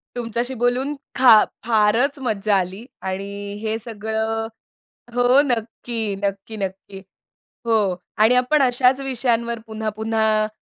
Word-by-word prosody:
तुमच्याशी 240 +2 -3
बोलून 250 +4 0 0.2
खा 240 -5 +7 0.2
फारच 230 +6 +2
मज्जा 215 -5 0
आली 190 +5 -3 0.2
आणि 200 +2 -5
हे 220 0 -1
सगळं 220 0 -2 0.7
हो, 245 +3 +5
नक्की. 230 -3 -3
नक्की, 200 +2 -3
नक्की. 195 0 -6 0.6
हो. 210 -5 +2 0.2
आणि 220 +4 +5
आपण 255 +4 +3
अशाच 255 0 +3
विषयांवर 235 -3 -1
पुन्हा-पुन्हा 220 0 0
225 Hz, 105 wpm, -21 LUFS, 210-245 Hz, 0.7 s, खा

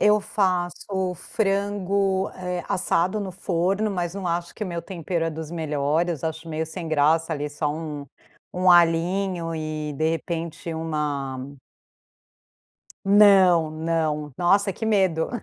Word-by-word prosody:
eu 210 0 +5
faço 185 -1 -1
frango, 195 0 0
eh, 180 -1 -4
assado 185 +2 +1
no 195 -2 -4
forno, 185 +3 0
mas 175 -2 -2
não 195 -2 -4
acho 170 0 -2
que 215 - -4
o - - -4
meu 170 -2 -3
tempero 170 -2 -3
é 165 - -1
dos 160 0 -7
melhores, 160 0 -1
acho 160 +1 -4
meio 160 0 -2
sem 160 +1 -6
graça, 160 +2 +2
ali, 145 0 -4
só 145 0 -1
um 150 -2 -5 0.4
um 180 0 +2
alhinho, 175 0 +3
e 155 -1 -4
de 155 +3 0
repente, 165 0 -3
uma 150 -4 -2 1.7
Não, 195 -5 +6
não. 155 -2 -1
Nossa, 195 +2 +3
que 225 - -5
medo. 190 -7 +2
170 Hz, 135 wpm, -24 LUFS, 160-190 Hz, 1.7 s, Não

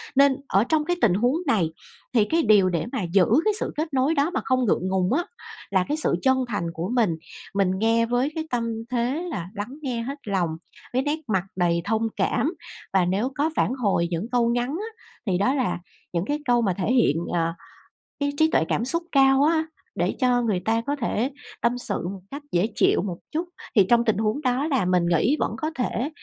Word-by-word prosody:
Nên 275 -1 +5
ở 195 +3 +3
trong 310 -2 +2
cái 350 +1 +1
tình 205 -7 +4
huống 245 +8 +2
này 185 -11 +2 0.4
thì 220 -4 +4
cái 330 +6 +1
điều 205 -4 +5
để 170 +2 -1
mà 260 -7 -2
giữ 190 -3 +6 0.2
cái 430 - +3
sự - - -3
kết 310 0 -2
nối 270 +4 +2
đó 285 +2 +2
mà - - 0
không 255 -1 +2
ngượng 185 -3 +1
ngùng 190 +4 +1
á, 340 - +2 0.5
là 185 -2 +2
cái 300 +2 -1
sự - - +1
chân 265 -1 +3
thành 205 -6 -2
của 170 +5 -4
mình. 215 -9 +2 0.4
Mình 195 -2 +2
nghe 230 +1 +3
với 245 +5 0
cái 320 - -2
tâm 240 -2 0 0.3
thế 255 +7 0
là 185 - -5
lắng 230 +8 -5
nghe 250 -5 -2
hết 275 +5 -5
lòng 185 -4 +1 0.4
với 255 - +2
nét 295 +3 -1
mặt 185 - +2
đầy 170 -2 +1
thông 225 +1 +1
cảm. 310 +6 0 0.4
Và 190 -2 +4
nếu 205 +8 0
có 300 +3 +1
phản - - +1
hồi 200 -9 +1
những 175 +7 -2
câu 240 -1 +2
ngắn 245 +1 0
á, 435 +8 -6 0.2
thì 185 - +2
đó 230 +8 +2
là 255 -9 0 0.3
những 170 +2 0
cái 295 +4 -1
câu 245 -2 +3
mà 195 -5 +1
thể 200 +5 0
hiện, 230 - +3 0.2
ờ, 165 -1 +1 0.7
cái 285 0 0
trí 315 +1 +4
tuệ - - +3
cảm 230 - 0
xúc 335 +6 0
cao 270 0 +5
á, 320 +1 +3 0.3
để - - 0
cho 250 -1 +3
người 215 -6 0
ta 225 +1 +2
có 285 - +1
thể 235 +3 0 0.3
tâm 240 +1 +1
sự 245 - -3
một 190 0 -6
cách 285 +2 -6
dễ 175 +4 +2
chịu - - +3
một 180 -4 -4
chút. 335 +3 -2 0.3
Thì 200 - +6
trong 235 0 +4
tình 220 -3 +2
huống 220 +6 0
đó 255 +2 0
là 265 - +1
mình 180 -1 +2
nghĩ 175 - +2
vẫn - - 0
có 310 0 -2
thể 250 +2 -1
240 Hz, 225 wpm, -24 LUFS, 195-280 Hz, 0.7 s, giữ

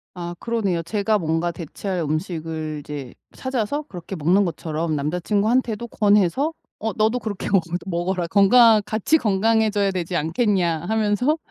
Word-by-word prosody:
아 175 -1 -5
그러네요. 205 -7 -1
제가 210 +4 0
뭔가 165 0 0
대체할 180 +3 -5
음식을 155 -1 -3
이제 140 -4 -7 0.2
찾아서 260 +2 -2
그렇게 190 - -8
먹는 180 +5 +3
것처럼 160 -2 -2
남자친구한테도 210 - 0
권해서 210 - +2 0.3
"어 220 0 -2
너도 220 +5 +1
그렇게 215 -4 -4
먹 195 - +5 0.2
먹어라. 180 0 -1
건강 215 +4 +6
같이 220 +9 +2
건강해져야 215 -2 +2
되지 180 -1 -3
않겠냐?" 170 0 +1
하면서 220 +7 +1
195 Hz, 340 characters per minute, -22 LUFS, 170-220 Hz, 0.3 s, 건강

